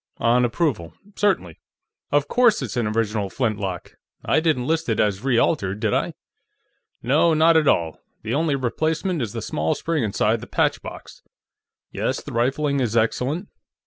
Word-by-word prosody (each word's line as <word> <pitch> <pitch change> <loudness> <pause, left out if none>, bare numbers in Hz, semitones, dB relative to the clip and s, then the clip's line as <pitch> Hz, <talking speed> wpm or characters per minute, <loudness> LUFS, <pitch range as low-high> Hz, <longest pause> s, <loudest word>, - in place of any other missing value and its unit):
On 120 +1 +3
approval; 120 - -1 0.2
certainly.... 175 - 0 0.5
Of 145 0 +2
course 240 0 +3
it's - - -5
an 120 -3 0
original 105 -2 -1
flintlock; 100 -6 -3 0.3
I 150 - +3
didn't 155 -6 +1
list 160 -1 -1
it 110 - 0
as 105 0 +1
re 130 -3 +2
altered, 100 - +1
did - - 0
I?... - - -1 0.9
No, 155 +7 +3
not 160 +1 +5
at 155 -2 +4
all; 80 -8 +1 0.2
the 110 +2 -3
only 150 0 +1
replacement 155 - -1
is 110 -4 -3
the 115 -2 -5
small 80 +1 -1
spring 165 -4 -1
inside 110 +1 0
the - - -9
patchbox.... - - -3 0.7
Yes, - - -2
the - - -9
rifling 140 +4 0
is 120 -3 0
excellent.... 130 - 0
125 Hz, 160 wpm, -22 LUFS, 110-155 Hz, 0.9 s, not